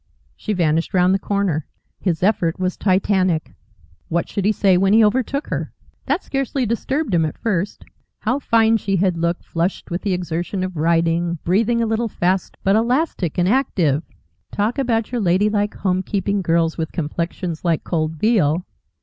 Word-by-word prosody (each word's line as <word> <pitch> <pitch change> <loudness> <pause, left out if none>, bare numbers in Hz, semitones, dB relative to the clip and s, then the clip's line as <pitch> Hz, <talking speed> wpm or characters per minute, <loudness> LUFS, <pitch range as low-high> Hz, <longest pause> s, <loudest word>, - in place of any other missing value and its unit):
She 215 - -3
vanished 165 -1 0
round 180 +1 +4
the 195 - +1
corner. 195 -8 -1 0.3
His 175 -3 -1
effort 180 -5 +1
was 185 0 -1
Titanic. 185 -3 +1 0.5
What 170 0 -1
should 200 - -3
he 210 - +4
say 195 -2 +3
when 195 +2 +3
he 220 0 +6
overtook 260 +6 0
her? - - -3 0.3
That - - 0
scarcely 270 -1 -1
disturbed 265 +3 -1
him 165 -2 +3
at 155 - -3
first. 205 -4 -2 0.4
How 250 +5 0
fine 225 -3 +3
she 195 -2 -1
had 185 -1 +2
looked, 170 +1 -1
flushed 170 +2 -2
with 175 - -2
the 200 -3 -1
exertion 180 +2 -2
of 185 -1 -4
riding, 170 +1 +1
breathing 230 +6 +2
a - - +1
little 225 +1 0
fast, 185 0 -1
but 195 +1 +3
elastic 235 - 0
and 175 0 +2
active! 180 - +2 0.5
Talk 215 +6 -1
about 230 -4 0
your 245 -2 -1
ladylike, 205 +3 +1
homekeeping 195 +1 -1
girls 165 -1 +1
with 160 - -2
complexions 170 +1 -3
like 170 -3 +1
cold 160 -2 -1
veal! 175 -3 +2
190 Hz, 165 wpm, -20 LUFS, 170-220 Hz, 0.5 s, he